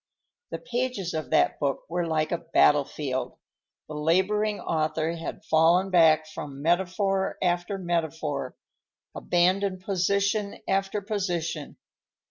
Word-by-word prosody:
The - - -4
pages 245 -7 -3
of 155 -1 -4
that 155 - +2
book 140 -2 -1
were 175 +1 -2
like 155 -1 0
a 170 - 0
battlefield; 145 -5 +1 0.5
the 155 - -8
laboring 190 +7 +1
author 160 0 -1
had 165 - -7
fallen 170 +4 +3
back 160 -3 +5
from 145 -3 -8
metaphor 190 +3 0
after 175 +2 0
metaphor, 160 -6 -2 0.6
abandoned 185 +2 +1
position 200 +2 0
after 195 +1 0
position. 175 -7 -3
175 Hz, 110 wpm, -26 LUFS, 155-195 Hz, 0.6 s, back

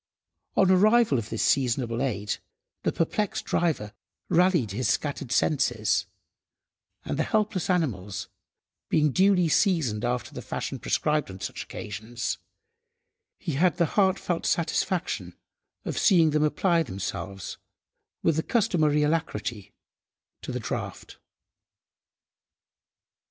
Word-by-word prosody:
On 190 - +5
the 190 - +5
arrival 215 - +4
of 110 0 -6
this 110 - -1
seasonable 120 -2 +1
aid, 105 -6 -1 0.4
the - - +1
perplexed 200 +5 -1
driver 140 -12 0 0.4
rallied 175 - +3
his 115 +3 -1
scattered 140 0 -1
senses, 120 -7 +1 1.0
and - - -3
the - - +3
helpless 210 -3 0
animals, 100 - -1 0.6
being 150 -2 +3
duly 185 +1 +4
seasoned 155 - +2
after 125 0 -2
the - - -6
fashion - - -4
prescribed 150 -4 0
on 95 0 -9
such - - -5
occasions, 110 +4 -5 1.0
he 165 - -4
had 175 +5 +2
the 170 - +3
heart–felt 190 -3 +1
satisfaction 175 +2 -1 0.5
of - - -2
seeing 170 -6 +5
them 150 0 +2
apply 170 +3 +2
themselves, 95 - -5 0.6
with 165 -2 +2
the - - +3
customary 160 -9 +2
alacrity, 120 - -2 0.7
to - - -5
the - - -3
draught. - - -5
150 Hz, 115 wpm, -27 LUFS, 115-180 Hz, 1.0 s, On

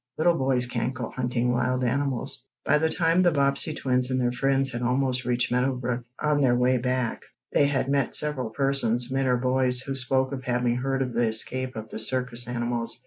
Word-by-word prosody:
"Little 170 +2 +3
boys 130 -4 +1
can't 125 +1 -3
go 125 -3 -5
hunting 125 -1 -1
wild 125 +1 0
animals." 130 +1 -2 0.2
By 150 - +3
the 160 +1 +1
time 165 +2 +2
the 180 - +5
Bobbsey 140 0 +1
twins 125 -1 +1
and 130 0 0
their 120 -1 +1
friends 135 +1 0
had 120 0 -5
almost 130 +1 0
reached 125 -1 0
Meadow 125 +2 +1
Brook, 125 -1 -3
on 150 -1 +1
their 125 -3 +3
way 125 +1 +2
back, 125 -1 -1 0.3
they 145 - +4
had 135 -2 -1
met 140 -2 0
several 145 -6 +1
persons 125 -1 0
men 135 0 0
or 125 -1 +2
boys 125 0 +2
who 135 +1 -4
spoke 130 0 0
of 130 -2 -5
having 125 -1 0
heard 135 +1 -1
of 125 -2 -5
the 120 0 +1
escape 130 +4 0
of 110 0 -7
the - - -5
circus 125 0 0
animals. 120 -1 -3
130 Hz, 205 wpm, -25 LUFS, 120-135 Hz, 0.3 s, the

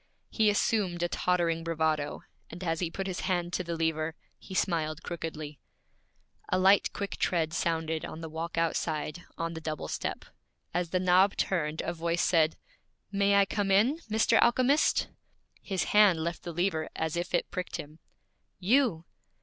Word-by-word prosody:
He 220 -2 +3
assumed 200 -4 +1
a - - +2
tottering 170 -2 0
bravado, 160 -3 -1 0.3
and 175 +3 -8
as 165 -2 -1
he 175 - -1
put 195 +3 -4
his 185 -2 -3
hand 175 -1 -1
to 185 - -1
the 170 -1 -3
lever, 160 -1 -1 0.2
he 190 - -9
smiled 160 -4 0
crookedly. 155 -4 -6 0.9
A 185 - +2
light, 195 +2 +4
quick 200 0 -4
tread 165 -3 0
sounded 160 -2 -1
on 160 - -6
the 165 - -5
walk 160 +2 -5
outside, 165 0 -1
on 165 0 -2
the 160 - -7
double 155 -1 -4
step; - - -4 0.5
as 175 -1 -1
the 185 - +1
knob 185 +2 +4
turned, 160 -4 0
a 170 - -3
voice 170 +1 -1
said, 160 -3 +3 0.5
'May 200 0 +3
I 200 0 +5
come, 205 0 -1
Mr. 225 +1 +3
Alchemist?' 255 +5 +3 0.5
His 190 -3 -1
hand 200 -6 +4
left 170 +1 -3
the 170 - -6
lever 165 -2 -1
as 160 0 -2
if 175 +1 -1
it - - -1
pricked 185 -1 -4
him. 155 +2 -8 0.6
'You!' 195 - +2
170 Hz, 165 wpm, -29 LUFS, 160-195 Hz, 0.9 s, I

